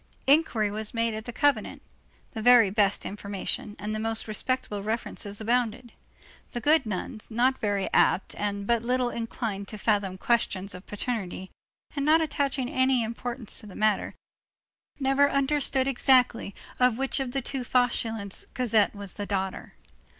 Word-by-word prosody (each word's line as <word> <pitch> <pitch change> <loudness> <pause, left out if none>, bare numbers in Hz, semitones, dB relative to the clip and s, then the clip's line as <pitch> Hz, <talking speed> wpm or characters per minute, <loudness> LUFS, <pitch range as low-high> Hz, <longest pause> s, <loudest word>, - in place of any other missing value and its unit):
Inquiry 265 -8 +3
was 215 +2 -2
made 230 0 +1
at 215 0 -6
that 240 - -7
convent; 280 -7 +1 0.5
the 220 - -5
very 235 -4 +6
best 205 -1 +1
information 205 +1 -4
and 210 +1 -4
the 215 - -2
most 225 0 -2
respectable 215 -1 -2
references 210 -1 -4
abounded; 235 +1 0 0.6
the 240 - -2
good 295 -1 +3
nuns, 210 +1 -5
not 245 +3 +2
very 205 -4 0
apt 190 - +3
and 200 -1 -2
but 235 +1 +2
little 250 +1 0
inclined 225 -3 -4
to 215 - -7
fathom 200 -3 0
questions 200 -3 0
of 180 +1 -11
paternity, 200 -4 -4 0.4
and 280 - -1
not 310 +3 +5
attaching 280 -4 -1
any 260 -1 +2
importance 235 0 -5
to 215 - -11
the 195 - -11
matter, 215 -2 +1 0.8
had - - -21
never 270 +1 +4
understood 275 -1 +1
exactly 250 -5 +3 0.2
of 250 -2 +4
which 270 +2 -1
of 265 -2 -2
the 270 +1 -1
two 265 0 -3
Fauchelevents 225 -5 0
Cosette 225 -5 +2
was 200 -2 -6
the 205 -1 -5
daughter. 190 -2 -3
230 Hz, 155 wpm, -27 LUFS, 205-255 Hz, 0.8 s, very